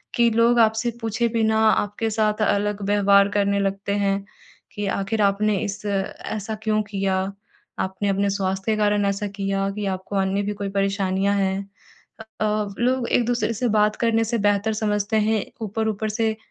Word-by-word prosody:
कि 235 -1 +4
लोग 235 +2 +3
आपसे 220 +1 +3
पूछे 225 +1 0
बिना 220 -1 +1
आपके 210 +1 0
साथ 215 0 0
अलग 205 0 0
व्यवहार 200 -1 +4
करने 200 -1 +1
लगते 200 0 -1
हैं 195 0 0 0.5
कि 205 - -3
आखिर 215 +3 -1
आपने 205 +1 +2
इस 200 +1 -5
ऐसा 205 +2 -3
क्यों 215 -1 +1
किया, 195 -2 -1 0.6
आपने 190 +2 -2
अपने 200 +1 +1
स्वास्थ्य 195 +1 -1
के 215 - +1
कारण 205 -1 +2
ऐसा 200 +1 -1
किया 195 0 -1
कि 210 -1 -3
आपको 190 +2 -8
अन्य 195 +1 +1
भी 210 - -2
कोई 200 -1 -4
परेशानियाँ 195 0 0
हैं। 195 0 -1 0.5
अ 220 - -8 0.2
अ, - - +3 0.3
लोग 250 0 +1
एक-दूसरे 240 -1 +1
से 240 +3 -1
बात 210 0 +3
करने 225 -1 +3
से 230 +1 -1
बेहतर 205 +1 +1
समझते 210 0 0
हैं 215 -3 +1 0.2
ऊपर-ऊपर 220 0 -2
से 220 +1 0
205 Hz, 165 wpm, -23 LUFS, 200-220 Hz, 0.6 s, कि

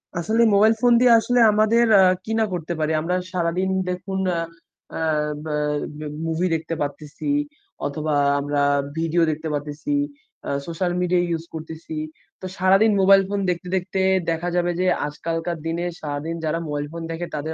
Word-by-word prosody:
আসলে 215 +8 +1
mobile 215 +3 +5
phone 245 -1 +5
দিয়ে 250 0 +5
আসলে 245 +2 +1
আমাদের 215 +3 +3
আ - - +7 0.2
কি 220 - -5
না 220 - +3
করতে 175 -1 -3
পারি? 155 0 0
আমরা 175 +3 -1 0.2
সারাদিন 180 +1 0 0.2
দেখুন, 185 +1 -3 0.2
আ - - 0 0.6
আ - - -3 0.5
বা 155 -1 -2 0.4
ম্যা 155 0 -6 0.2
মুভি 165 +3 0
দেখতে 165 +1 -4
পারতেছি 150 - -5 0.6
অথবা 150 +2 -2 0.3
আমরা 145 0 -1 0.4
ভিডিও 165 +1 +1
দেখতে 155 +1 -5
পারতেছি, 145 0 -3 0.5
আ - - -3 0.2
সোশ্যাল 175 +2 -1
মিডিয়া 180 0 +2
ইউজ 165 -1 -2
করতেছি। 160 0 -7 0.5
তো - - -6
সারাদিন 195 +4 +4
মোবাইল 195 +1 +7
ফোন 205 0 -1
দেখতে, 180 0 -2
দেখতে, 190 +1 -1 0.3
দেখা 165 +2 -2
যাবে 175 0 +1
যে 185 - +1 0.2
আজকালকার 165 +3 -3
দিনে 170 +2 -2 0.2
সারাদিন 150 +2 -4
যারা 155 +2 0
মোবাইল 145 0 -3
ফোন 165 0 -6
দেখে 165 +1 -4
তাদের 155 +2 -3
170 Hz, 165 wpm, -22 LUFS, 155-185 Hz, 0.6 s, আ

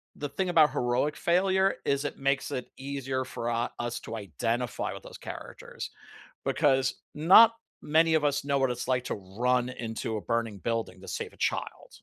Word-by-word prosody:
the 145 - -4
thing 185 +6 -2
about 160 -3 +5
heroic 125 +5 0
failure 190 +2 +2
is 140 +1 +1
it 145 - -3
makes 135 0 0
it 125 - -4
easier 135 -1 -3
for 120 -2 -4
u 115 +1 0 0.2
us 120 0 -3
to - - -6
identify 115 - -2
with - - -9
those - - -10
characters, - - -8 0.5
because 135 -3 +2 0.2
not 195 +9 +8 0.3
many 160 +2 +3
of 155 -2 +3
us 145 -1 +1
know 140 -1 +1
what 135 - +2
it's 125 +1 -4
like 125 -1 +1
to - - -2 0.2
run 125 0 +2
into 115 -3 -4
a - - -4
burning 115 -3 -2
building 115 -5 -3
to 95 - -12
save - - -4
a - - -19
child. - - -2
130 Hz, 185 wpm, -29 LUFS, 120-150 Hz, 0.5 s, not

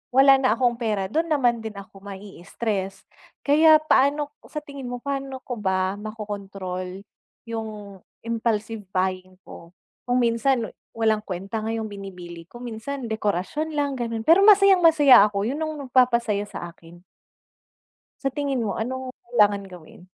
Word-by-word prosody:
wala 270 +1 +8
na 255 -4 +3
akong 240 -2 +1
pera, 210 -4 0
dun 325 +2 0
naman 245 -6 +2
din 220 -1 -6
ako 195 0 -11
ma-stress. 195 0 -5 0.4
Kaya 310 +2 +6
paano 290 -1 +2 0.2
sa 300 - -5
tingin 280 -3 -8
mo 245 - -4
paano 275 -1 -4
ko 245 - -5
ba 190 -1 0
makokontrol 195 -3 -6 0.4
yung 215 -4 -7 0.3
impulsive 225 -2 -2
buying 185 -1 -2
ko? 170 - -12 0.4
Kung 245 - +3
minsan 235 +1 +1 0.3
walang 220 -1 +2
kuwenta 195 +2 -5
nga 220 - -3
yung 225 -1 -2
binibili 180 -5 -9
ko. - - -12
Minsan 245 +3 -6
dekorasyon 220 - -2
lang 285 -1 0
gano'n, 230 -3 -4
pero 335 +7 +6
masayang-masaya 360 - +7
ako. 200 0 -2
Yun 275 +7 -3
yung 310 -1 -2
nagpapasaya 235 -5 +2
sa - - -6
akin. 170 +1 -17 1.2
Sa 275 - 0
tingin 275 -1 -2
mo 215 -4 -2
anong 255 +2 -4
kailangan 210 -4 +2
gawin? 180 -2 -14
225 Hz, 145 wpm, -24 LUFS, 200-270 Hz, 1.2 s, wala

